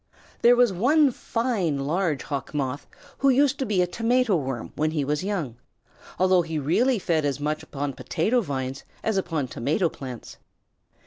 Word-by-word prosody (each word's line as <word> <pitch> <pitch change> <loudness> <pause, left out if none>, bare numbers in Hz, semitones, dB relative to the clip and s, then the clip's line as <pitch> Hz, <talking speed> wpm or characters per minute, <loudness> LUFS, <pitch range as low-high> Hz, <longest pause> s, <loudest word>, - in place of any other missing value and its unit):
There 240 +1 +7
was 245 -4 +4
one 275 - +4
fine 230 - -1
large 155 +2 -1
Hawk 140 0 -5
Moth 140 -1 -2 0.3
who 275 - +4
used 275 +1 +3
to 265 - -1
be 190 -4 +2
a - - +2
Tomato 230 +4 +1
Worm 130 -7 -3
when 155 +1 +1
he 155 -3 -1
was 150 +4 -1
young, 175 - -3 0.6
although 185 -1 +4
he 165 -2 -4
really 225 - +2
fed 170 -5 0
as 140 -1 -1
much 150 +1 -2
upon 140 -1 -4
potato 220 - 0
vines 135 - -4 0.2
as 220 - 0
upon 165 -7 -1
tomato 155 - 0
plants. 130 -5 -9
165 Hz, 170 wpm, -25 LUFS, 145-225 Hz, 0.6 s, There